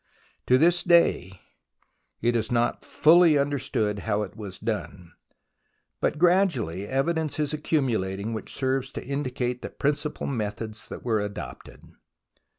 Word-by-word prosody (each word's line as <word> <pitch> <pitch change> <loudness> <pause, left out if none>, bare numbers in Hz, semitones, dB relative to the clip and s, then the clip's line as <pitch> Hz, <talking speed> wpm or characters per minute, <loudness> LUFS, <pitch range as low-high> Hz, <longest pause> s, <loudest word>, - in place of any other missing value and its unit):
To 125 - +5
this 175 +4 +4
day 130 - +3 0.8
it 120 0 +2
is 115 0 -1
not 120 0 +1
fully 165 -1 +5
understood 130 -7 -1
how 105 0 -1
it 100 - -8
was 100 -4 -7
done, 105 -6 -5 0.9
but - - 0
gradually 150 - +2
evidence 155 +4 -1
is 150 0 0
accumulating 115 -9 -1
which 110 - -5
serves 135 0 -1
to - - -6
indicate 125 -3 -2
the - - -5
principal 150 +1 -2
methods 110 -3 -4
that - - -9
were 110 -3 +1
adopted. 105 0 -7
125 Hz, 130 wpm, -26 LUFS, 105-150 Hz, 0.9 s, To